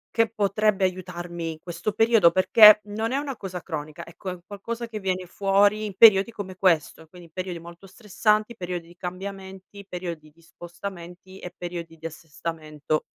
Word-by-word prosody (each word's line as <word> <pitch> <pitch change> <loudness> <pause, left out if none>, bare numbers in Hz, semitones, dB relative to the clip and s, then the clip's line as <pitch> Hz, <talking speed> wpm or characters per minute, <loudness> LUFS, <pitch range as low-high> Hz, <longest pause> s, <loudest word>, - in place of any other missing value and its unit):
che 230 -1 +3
potrebbe 210 -1 +1
aiutarmi 175 -2 -3
in 155 - -15
questo 175 +4 -4
periodo? 225 -4 +5
Perché 210 +3 +7
non 220 +3 -3
è 275 - +1
una 280 -2 -3
cosa 185 -4 -7
cronica, 155 0 -6
ecco, 175 +3 -8
è - - -3
un 180 - -12
qualcosa 230 +4 -6
che 220 -2 -6
viene 185 -2 -2
fuori 200 +3 +2
in 200 -3 -6
periodi 210 -1 +7
come 195 -4 -7
questo, 165 -3 +1
quindi 170 -1 -15
periodi 185 0 -5
molto 170 +3 -12
stressanti, 215 +2 0
periodi 180 -4 -5
di 175 +1 -17
cambiamenti, 190 +2 -8
periodi 170 -4 -6
di 165 - -25
spostamenti 175 +2 -10
e 180 - -8
periodi 170 -2 -7
di 165 - -13
assestamento. 155 -1 -4
185 Hz, 170 wpm, -25 LUFS, 170-205 Hz, -, Perché